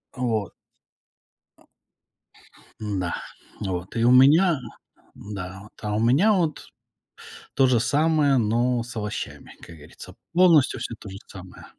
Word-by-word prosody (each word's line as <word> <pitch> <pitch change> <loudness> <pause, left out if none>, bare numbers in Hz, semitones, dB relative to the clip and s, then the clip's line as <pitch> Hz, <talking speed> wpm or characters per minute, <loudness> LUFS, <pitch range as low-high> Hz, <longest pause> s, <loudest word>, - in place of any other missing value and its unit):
Э, 125 - -8
вот. 110 -6 -1 2.3
Н-да, 95 -4 -3 0.5
вот, 90 -3 -5
и 115 - 0
у 120 - +5
меня, 150 +5 +5 0.6
да, 95 -2 -8
вот, 105 - -17
а 105 -1 -3
у 105 - 0
меня 140 - +4
вот 165 -5 -1 0.9
то 135 - +4
же 125 -2 +3
самое, 145 +2 +2
но 120 +2 +1
с 125 +1 -10
овощами, 105 -1 -6
как 85 - -12
говорится, 75 -1 -13 0.2
полностью 165 -8 +4
всё 115 0 -5
то 100 - -10
же 95 - -9
самое. 95 -1 -12
120 Hz, 130 wpm, -24 LUFS, 105-140 Hz, 2.3 s, у